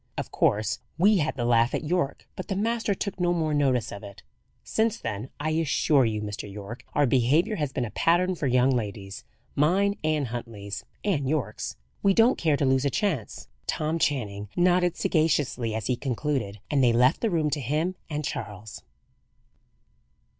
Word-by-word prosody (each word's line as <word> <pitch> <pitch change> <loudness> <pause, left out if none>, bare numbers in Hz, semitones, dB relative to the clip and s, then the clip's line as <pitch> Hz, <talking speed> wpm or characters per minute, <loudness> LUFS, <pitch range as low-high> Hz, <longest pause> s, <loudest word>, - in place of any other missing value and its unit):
Of - - -4
course 105 +1 +1 0.2
we 200 +4 +5
had 155 -4 0
the 120 -3 -2
laugh 120 0 +3
at - - -2
Yorke; 155 -3 -1
but 185 - -6
the 195 - -2
master 220 0 0
took 195 -1 -4
no 175 -1 +2
more 160 -3 0
notice 135 -5 +1
of 100 - -7
it. 100 -1 -11 0.4
Since 225 0 0
then, 110 +4 -5
I 155 +2 -1
assure 150 -3 +3
you, 110 -1 -1
Mr. 105 -1 -5
Yorke, 105 +4 -8
our 145 - +4
behaviour 140 - +2
has 150 -4 -1
been 125 -2 -1
a 110 - -7
pattern 180 +2 +2
for 150 -5 -2
young 125 +1 +3
ladies 100 -5 -4 0.3
mine, 195 +7 +2
and 155 -5 0
Huntley's, 110 -4 -6 0.2
and 150 -10 0
Yorke's. 135 -8 -2 0.3
We 195 -1 +3
don't 230 +3 +4
care 155 -4 +2
to 140 - +1
lose 130 0 +3
a 140 - +2
chance." 150 - -2 0.2
Tom 155 +2 -1
Channing 105 -10 -1
nodded 180 0 +3
sagaciously 145 -7 +1
as 110 -2 -3
he 125 - +1
concluded, 125 -5 -2
and 140 -3 +3
they 120 -2 +5
left 125 +6 +3
the 230 - +1
room 160 -5 +1
to 145 - -1
him 155 +8 0 0.2
and 150 -1 -3
Charles. 105 -3 -6
140 Hz, 180 wpm, -26 LUFS, 115-170 Hz, 0.4 s, we